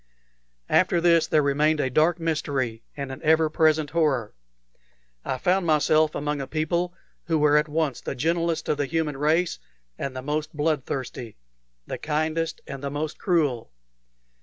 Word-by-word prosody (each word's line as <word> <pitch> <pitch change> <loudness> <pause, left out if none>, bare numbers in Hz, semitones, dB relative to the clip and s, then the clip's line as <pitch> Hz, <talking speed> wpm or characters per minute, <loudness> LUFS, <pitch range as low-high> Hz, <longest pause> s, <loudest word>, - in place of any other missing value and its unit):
After 180 -1 +4
this 170 -1 +4
there 150 - +3
remained 150 +2 +2
a 130 -3 0
dark 160 +5 +3
mystery 140 -8 -2 0.2
and 140 -1 -4
an 130 - -8
ever 160 0 +3
present 155 -1 +2
horror. 150 -9 +1 0.9
I 130 - -2
found 180 +6 +1
myself 155 0 +3
among 145 0 -2
a 135 - -5
people 170 +3 -1 0.3
who 165 -1 +1
were 150 -1 +4
at 150 +1 +3
once 150 -4 -1
the - - -4
gentlest 165 +4 0
of 150 - +1
the 145 -1 -1
human 160 -1 -1
race 160 +5 +1 0.4
and 135 -1 -4
the 130 - -5
most 155 +2 -3
blood 150 -3 0
thirsty 125 - -5 0.5
the - - -5
kindest 155 +1 -1
and 135 0 -8
the 140 - -2
most 150 +2 -4
cruel. 145 - 0
155 Hz, 160 wpm, -25 LUFS, 140-160 Hz, 0.9 s, After